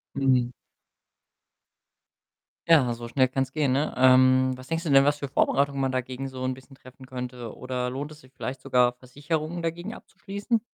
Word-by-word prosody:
Mhm. 130 -3 +2 2.2
Ja, 135 -7 +6
so 120 0 -7
schnell 130 +1 +2
kann's 135 +1 -2
gehen, 145 -4 +1
ne? 145 +4 0
Ähm, 130 0 +5
was 130 0 -12
denkst 165 +4 -2
du 160 - -1
denn, 135 0 +7
was 145 0 +3
für 140 - -4
Vorbereitungen 140 +1 +1
man 135 -1 +1
dagegen 130 +1 -3
so 130 -1 -6
'n 130 - 0
bisschen 130 +1 -13
treffen 130 0 -15
könnte? 125 -2 -7
Oder 125 -1 -3
lohnt 140 +4 -5
es 150 - -14
sich 130 - -20
vielleicht 130 0 -5
sogar, 125 -2 +3
Versicherungen 150 +7 -4
dagegen 175 +6 -4
abzuschließen? 200 +4 -3
130 Hz, 175 wpm, -26 LUFS, 130-145 Hz, 2.2 s, denn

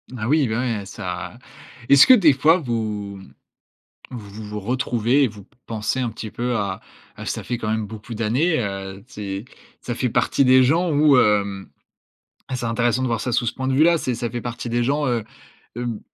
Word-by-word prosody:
Ah 110 0 -3
oui, 150 -3 +3
ben 110 +3 -1 0.2
ouais, 100 - -8
ça 90 +2 -6 0.5
est-ce 140 +1 +8
que 260 - +9
des 185 -11 +6
fois 150 +6 +4
vous, 110 -6 -3
mmh, 95 - -15 0.8
vous 105 -1 -9
vous 105 0 -5
retrouvez 125 +3 +1
et 130 - +3
vous 105 -2 -13
p - - -33
pensez 115 +3 -2
un 120 -3 -1
petit 110 0 -8
peu 120 0 -1
à 100 -3 -2 0.3
à - - -9
ça - - -4
fait 125 - -2
quand 110 -2 -3
même 110 -1 -1
beaucoup 110 +2 -9
d'années, 125 +10 +1
heu, 95 -2 -5
ces, 100 -4 -6 0.4
ça 120 - -4
fait 125 +1 -1
partie 140 - +2
des 130 0 +6
gens 165 +7 +2
où, 145 -2 +5
hem, 100 -3 +1 0.9
c'est 120 - -4
intéressant 120 +2 +1
de - - +1
voir 115 -2 -1
ça 125 - -2
sous 120 +1 +1
ce - - -1
point 130 0 -4
de 130 - +1
vue 150 - +5
là, 170 -1 +4
c'est, 125 - -2
ça 120 0 -4
fait 120 - -4
partie 120 0 -5
des 120 +1 +1
gens, 145 +4 0
heu, 120 -3 0 0.5
hem, 120 -3 -4
120 Hz, 210 wpm, -22 LUFS, 105-130 Hz, 0.9 s, que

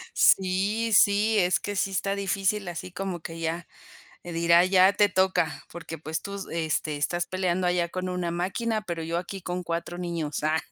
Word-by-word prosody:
Sí, 200 +5 +3
sí, 210 +1 +4
es 180 -2 +3
que 205 0 -4
sí 195 - +1
está 195 +1 0
difícil, 195 +1 0
así 175 +1 -6
como 185 -2 -4
que 165 +1 -8
ya 165 +1 -3 0.6
dirá: 170 0 +4
"Ya 190 +1 +5
te 205 0 +4
toca 185 -5 +1
porque, 165 -1 -8
pues, 160 +1 -4
tú 200 - -7
s 195 -2 -6
este, 155 -2 -1
estás 175 +4 -1
peleando 185 -1 0
allá 175 -1 +1
con 185 +1 -4
una 180 -1 -2
máquina, 200 +6 -1
pero 170 -4 -4
yo 165 +1 -2
aquí 190 +2 -6
con 180 +1 -4
4 170 +1 -4
niños". 165 -5 -3
Ah. 155 +1 +2
180 Hz, 185 wpm, -26 LUFS, 170-195 Hz, 0.6 s, Ya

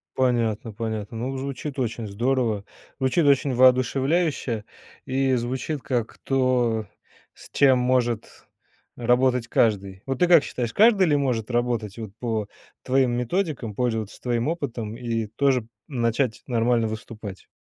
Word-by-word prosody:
Понятно, 115 -4 0
понятно, 110 0 -4
ну, 130 +3 -3
звучит 140 +1 -5
очень 115 -2 -2
здорово, 115 -1 0 0.3
звучит 130 +5 +2
очень 140 -1 +3
воодушевляюще 130 0 +2 0.4
и 135 0 +1
звучит 130 +5 -3
как 120 -4 -2
то, 125 -4 +1 0.5
с - - -15
чем 135 -2 +5
может 125 -3 +1 0.7
работать 125 0 +2
каждый. 100 -5 +1
Вот 135 -1 -3
ты 180 - +4
как 170 -4 +7
считаешь, 120 -2 -3
каждый 210 -4 +5
ли 150 - +3
может 125 -6 0
работать 120 -3 -1
вот 110 -4 -6
по 110 -4 -2 0.4
твоим 130 -1 +2
методикам, 125 - -2
пользоваться 110 -3 -2
твоим 120 +3 0
опытом 120 -9 -4
и 115 -3 -2
тоже 125 +2 +1 0.2
начать 120 -2 -1
нормально 115 -1 +1
выступать? 110 -2 -8
120 Hz, 130 wpm, -24 LUFS, 115-135 Hz, 0.7 s, как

